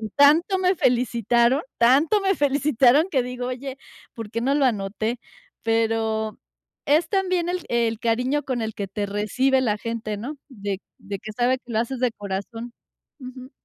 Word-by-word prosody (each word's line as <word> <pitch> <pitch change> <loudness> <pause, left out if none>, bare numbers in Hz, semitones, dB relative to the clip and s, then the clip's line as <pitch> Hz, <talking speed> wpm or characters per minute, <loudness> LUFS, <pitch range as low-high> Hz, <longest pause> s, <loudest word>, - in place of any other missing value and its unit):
tanto 315 +7 +5
me 370 0 +2
felicitaron, 240 - +2 0.2
tanto 280 - +4
me 390 -1 +2
felicitaron, 285 0 +3
que 260 -7 +1
digo: 250 0 -5
“Oye, 260 +1 -5 0.4
¿por 225 -4 -7
qué 230 - -2
no 275 +3 +1
lo 280 -2 +3
anoté?”. 220 +1 -1 0.4
Pero 225 -1 0 0.5
es 310 +3 +3
también 370 -3 0
el 360 -1 -2
el 230 -2 +1
cariño 250 +6 0
con 255 -3 -2
el 220 -1 -3
que 200 -1 -4
te 205 +1 -3
recibe 255 +7 +1
la 215 -4 +1
gente, 225 -2 -4
¿no?, 280 +8 -6
de 200 -5 -5 0.2
de 200 -2 -6
que 215 - -8
sabe 250 +2 +1
que 245 - -12
lo 220 - +1
haces 240 +2 -2
de 250 -2 +2
corazón. 215 +4 -6 0.5
Ujú. 255 0 -10
245 Hz, 165 wpm, -23 LUFS, 225-275 Hz, 0.5 s, tanto